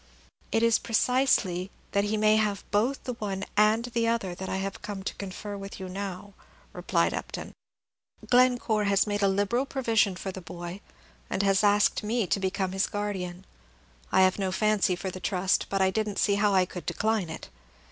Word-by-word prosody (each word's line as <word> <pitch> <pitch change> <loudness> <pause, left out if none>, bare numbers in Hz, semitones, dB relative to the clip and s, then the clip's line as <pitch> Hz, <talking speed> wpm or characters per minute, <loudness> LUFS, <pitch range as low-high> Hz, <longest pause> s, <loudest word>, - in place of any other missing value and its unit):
"It 225 - +2
is 230 -1 +4
precisely 220 -6 +1 0.2
that 200 0 +1
he 215 +1 0
may 215 0 +4
have 210 -2 0
both 230 +7 +1
the 250 - -3
one 200 -4 -4
and 215 +2 +4
the 235 -1 -1
other 230 -6 0
that 190 +2 -6
I - - -1
have 195 +1 -4
come 205 -2 -6
to - - -3
confer 200 +1 -6
with 195 0 -8
you 190 - -5
now," 195 +1 -6 0.4
replied - - +1
Upton. - - -6 0.7
"Glencore 245 -4 +3
has 200 0 +3
made 205 -1 -2
a 200 - +4
liberal 205 +7 +1
provision 225 -8 +1
for 190 +2 -5
the 190 - -8
boy, 175 +3 -7 0.5
and 195 - 0
asked 205 +1 +3
me 220 +1 0
to 185 - 0
become 190 0 -1
his 190 +1 0
guardian. 190 -3 -4 0.7
I - - +5
have 185 +1 +3
no 190 -1 0
fancy 210 -2 +2
for 185 +1 -4
the 185 - -7
trust, 185 +1 0
but 195 -1 +1
I 190 - +3
did 215 +1 -1
n't 200 - -6
see 200 - +3
how 205 +1 +2
I 185 -1 +4
could 180 -1 -9
decline 215 -5 0
it. 160 - -8
200 Hz, 190 wpm, -27 LUFS, 190-215 Hz, 0.7 s, I